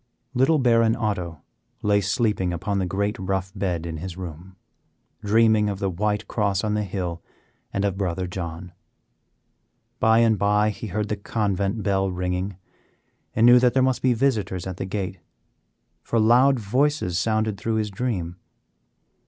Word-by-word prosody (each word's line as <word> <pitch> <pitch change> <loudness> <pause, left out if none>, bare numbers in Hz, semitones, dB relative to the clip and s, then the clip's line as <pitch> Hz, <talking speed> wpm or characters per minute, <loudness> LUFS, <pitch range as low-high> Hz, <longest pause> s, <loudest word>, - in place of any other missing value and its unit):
Little 135 +5 +3
Baron 115 -4 +3
Otto 90 - -3 0.4
lay 105 -1 +3
sleeping 100 -2 0
upon 95 +4 -2
the 95 - -1
great 100 +5 -1
rough 95 0 -2
bed 90 -4 -2
in 80 -1 -5
his 90 +2 -7
room, 90 +1 -8 0.7
dreaming 110 0 +4
of 100 - -3
the 95 -1 -1
White 105 +3 -1
Cross 100 -3 0
on 105 -1 0
the 105 - 0
hill 90 -3 -4 0.5
and 100 - -1
of 95 -1 -1
brother 90 -1 -1
John. 90 -1 -6 1.3
By 110 0 +4
and 115 -3 +3
by 105 +2 +3
he 110 - -7
heard 105 +2 -2
the 105 - 0
convent 100 0 -1
bell 95 -1 +1
ringing, 90 +1 -3 0.8
and 115 - +4
knew 120 +1 +8
that 125 0 +2
there 130 - +4
must 130 -1 +1
be 130 -1 +3
visitors 110 -8 0
at 95 -1 -5
the - - -3
gate, 95 -1 -4 0.8
for 115 - 0
loud 125 +4 +5
voices 115 - 0
sounded 110 0 0
through 110 +4 -1
his 105 -2 -1
dream. 95 -6 -3
100 Hz, 160 wpm, -24 LUFS, 95-110 Hz, 1.3 s, knew